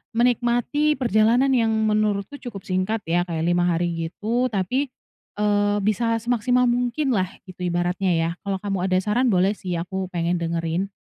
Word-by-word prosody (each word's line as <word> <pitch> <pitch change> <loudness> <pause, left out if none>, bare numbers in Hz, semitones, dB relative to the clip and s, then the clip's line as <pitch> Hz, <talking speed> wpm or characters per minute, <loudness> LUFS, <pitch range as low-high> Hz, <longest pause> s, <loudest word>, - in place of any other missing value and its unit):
menikmati 245 +5 +2
perjalanan 240 +2 +3
yang 230 -3 +2
menurutku 215 +3 0
cukup 205 -7 -8
singkat 190 +4 -1
ya 175 +2 0
kayak 165 -1 -2
5 175 +1 +2
hari 175 0 +1 0.2
gitu, 235 +8 -1
tapi, 250 +6 -1 0.5
eee, 205 0 +1
bisa 230 +3 +1
semaksimal 245 +1 +2
mungkinlah 245 -4 +1 0.2
gitu 185 -1 -12
ibaratnya 175 +2 0
ya? 165 0 +1
Kalau 200 -1 -1
kamu 195 -2 -2
ada 185 - +1
saran 240 +5 +1
boleh 190 -2 +3
sih 180 -3 -4
aku 185 +2 -3
pengen 175 0 0
dengerin. 165 +2 -1
205 Hz, 150 wpm, -23 LUFS, 180-240 Hz, 0.5 s, perjalanan